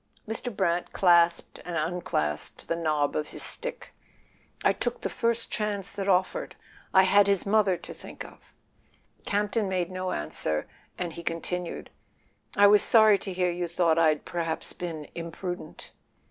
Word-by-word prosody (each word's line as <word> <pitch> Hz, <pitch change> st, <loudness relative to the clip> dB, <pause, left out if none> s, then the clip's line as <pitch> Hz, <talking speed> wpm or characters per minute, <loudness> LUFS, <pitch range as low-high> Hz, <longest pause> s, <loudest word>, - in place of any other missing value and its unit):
Mr. 225 Hz, +3 st, -3 dB
Brant 175 Hz, -4 st, -1 dB
clasped 170 Hz, -2 st, +3 dB
and 175 Hz, -2 st, -4 dB
unclasped 155 Hz, -, -2 dB
the 165 Hz, -, 0 dB
knob 155 Hz, -3 st, 0 dB
of 150 Hz, -, -1 dB
his -, -, -3 dB
stick. -, -, -1 dB, 0.7 s
"I -, -, +4 dB
took -, -, -3 dB
the -, -, -3 dB
first 230 Hz, 0 st, 0 dB
chance 205 Hz, -3 st, -2 dB
that 200 Hz, -1 st, -3 dB
offered; 195 Hz, -, +1 dB, 0.4 s
I 190 Hz, -, +6 dB
had 200 Hz, +1 st, +5 dB
his 200 Hz, -2 st, +2 dB
mother 200 Hz, -3 st, +3 dB
to -, -, -10 dB
think -, -, -9 dB
of." -, -, -16 dB, 0.8 s
Campton 210 Hz, 0 st, 0 dB
made 185 Hz, -1 st, -1 dB
no 185 Hz, 0 st, -3 dB
answer, 75 Hz, +1 st, -2 dB, 0.3 s
and 175 Hz, -2 st, -3 dB
he 170 Hz, -, -7 dB
continued: 170 Hz, +1 st, -4 dB, 0.6 s
"I 205 Hz, -, +6 dB
was 205 Hz, 0 st, +7 dB
sorry 215 Hz, -3 st, +6 dB
to 195 Hz, -, -5 dB
hear 180 Hz, -1 st, 0 dB
you 175 Hz, 0 st, -3 dB
thought 165 Hz, -1 st, +2 dB
I'd 155 Hz, -2 st, +2 dB
perhaps 165 Hz, -2 st, -3 dB
been 165 Hz, -4 st, -6 dB
imprudent." 175 Hz, +2 st, -7 dB
180 Hz, 155 wpm, -27 LUFS, 165-200 Hz, 0.8 s, was